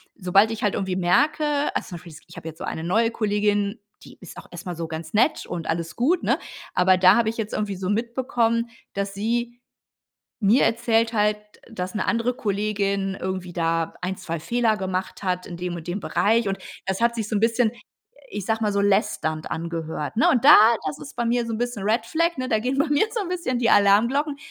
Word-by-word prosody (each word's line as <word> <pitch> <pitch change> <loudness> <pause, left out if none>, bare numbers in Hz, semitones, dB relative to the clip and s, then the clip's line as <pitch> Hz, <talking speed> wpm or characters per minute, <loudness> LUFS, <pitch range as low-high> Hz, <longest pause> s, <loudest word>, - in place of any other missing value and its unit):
sobald 195 +2 +3
ich 225 - -5
halt 205 - +1
irgendwie 190 -2 -2
merke 290 - +1
also - - -2
zum 180 - -7
Beispiel, 170 0 -13
ich - - -14
habe - - -8
jetzt 160 0 -9
so - - -6
eine 160 - -4
neue 225 +7 +2
Kollegin, 205 -1 0 0.2
die - - -14
ist 185 - -11
auch - - -10
erst 175 -1 -9
mal 180 -1 -4
so 165 0 -4
ganz 160 0 -7
nett 245 +9 +2
und 170 -3 -5
alles 165 0 -2
gut, 320 +9 +1
ne, - - +2 0.4
aber 185 +1 +4
da 185 0 +6
habe 235 -2 +2
ich 225 - -5
jetzt 220 -2 -4
irgendwie 205 -2 -2
so 185 0 -3
mitbekommen, 235 +1 0 0.2
dass 200 0 -3
sie 235 +4 -2 0.8
mir 220 +4 +4
erzählt 230 0 +2
halt, 210 -1 +2 0.3
dass 185 -5 -5
'ne 210 - -1
andere 230 +1 +1
Kollegin 200 -3 -1
irgendwie 185 -1 -4
da 165 -1 -1
1, 185 +1 -2
2 165 -1 -5
Fehler 230 +5 +1
gemacht 190 -1 -4
hat 180 -1 -1
in 175 - -8
dem 175 0 -4
und 170 -1 -8
dem 175 +3 -3
Bereich 225 +2 +1
und 195 0 -1 0.3
das 190 +3 -2
hat 235 0 +3
sich 220 -3 -3
so 215 - -2
'n - - +2
bisschen 230 0 +2 0.6
ich 200 - -4
sage 225 0 0
mal 210 -1 +1
so 200 - +1
lästernd 195 -6 0
angehört, 165 +1 -4
ne? 235 - +4
Und 245 - +2
da, 295 - +11 0.3
das 150 -1 -3
ist 150 - -11
bei 240 - -1
mir 240 +1 +1
so 230 - -4
'n 220 - -3
bisschen 245 -3 -3
Red 220 +3 0
Flag, 335 +4 0
ne? 255 0 -2
Da 220 -3 +1
gehen 255 +4 -1
bei 290 - +3
mir 295 +5 +3
so 455 - 0
'n 390 - -4
bisschen 345 -9 -2
die 235 -1 +1
Alarmglocken, 235 +10 +3
210 Hz, 225 wpm, -23 LUFS, 185-235 Hz, 0.8 s, da